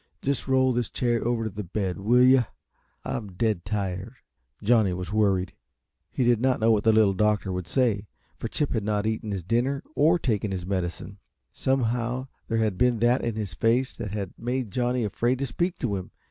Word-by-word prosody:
Just 140 0 -1
roll 130 -1 +3
this 120 -1 -1
chair 120 -2 0
over 120 -1 0
to 110 - -2
the 105 +2 -5
bed, 95 0 -3
will 120 +5 +4
you? 130 -1 +6 0.6
I'm 105 -5 -4
dead 105 -2 0
tired." 100 +2 -3 0.5
Johnny 110 -4 +4
was 90 +2 -5
worried. 100 -4 +2 0.6
He 130 - -1
did 120 -2 +3
not 130 0 +2
know 115 +1 +4
what 105 -2 +2
the 110 - +5
Little 110 -3 +4
Doctor 105 0 +1
would 90 -1 -4
say, 110 -4 +1 0.3
for - - -3
Chip 150 - -2
had 110 -4 -1
not 105 0 0
eaten 110 0 -2
his 95 -3 -3
dinner, 120 - 0
or 160 +4 +4
taken 110 - -1
his 95 -2 -4
medicine. 95 +1 -3 0.3
Somehow 125 0 -1 0.2
there 115 - 0
had 110 -4 0
been 125 -2 +3
that 120 +3 +2
in 115 -2 -1
his 105 -5 -4
face 120 +8 +1
that 115 -3 -5
had 100 -2 -4
made 125 -2 -2
Johnny 125 +2 0
afraid 120 +5 0
to 140 - -2
speak 170 +9 -2
to 110 -6 -1
him. 90 -1 -7
110 Hz, 200 wpm, -26 LUFS, 100-125 Hz, 0.6 s, you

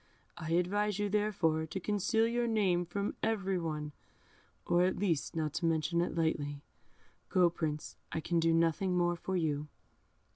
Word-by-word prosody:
I 160 +1 -4
advise 200 +4 +1
you, 205 0 0
therefore, 185 -7 +1
to 175 +4 -4
conceal 210 +3 +1
your 235 +1 0
name 190 -6 +2
from 200 +3 -2
every 195 -4 0
one, 150 -3 -3 0.7
or 175 +1 +3
at 185 +1 +1
least 170 -8 0
not 155 -2 -1
to 170 - -1
mention 165 +1 +1
it 175 - -2
lightly. 145 -3 -1 0.7
Go, 180 -2 +4
Prince, 150 -3 -4
I - - -1
can 170 +1 0
do 165 0 +3
nothing 165 +3 +2
more 175 0 +2
for 185 +2 -2
you." 150 -3 -1
175 Hz, 160 wpm, -33 LUFS, 160-200 Hz, 0.7 s, Go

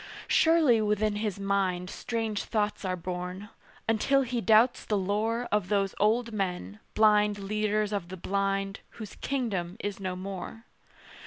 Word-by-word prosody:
Surely 315 -9 +4
within 210 0 +1
his 210 -2 -2
mind 195 -2 0
Strange 225 +1 -3
thoughts 210 -2 -1
are 185 -1 -1
born, 180 +3 -5 0.4
until 270 +5 +3
he 245 -1 -2
doubts 225 +3 +4
the 210 - 0
lore 215 +5 -1
Of 205 -3 +1
those 200 -2 +1
old 230 +3 +2
men, 180 - -3 0.2
blind 210 -1 +4
leaders 210 +1 -1
of 195 -4 -2
the 190 - -7
blind, 195 +2 -1 0.2
Whose 215 -4 -8
kingdom 205 -9 -2
is 205 -1 -4
no 185 -2 -3
more. 195 +4 -7
205 Hz, 145 wpm, -28 LUFS, 195-220 Hz, 0.4 s, Surely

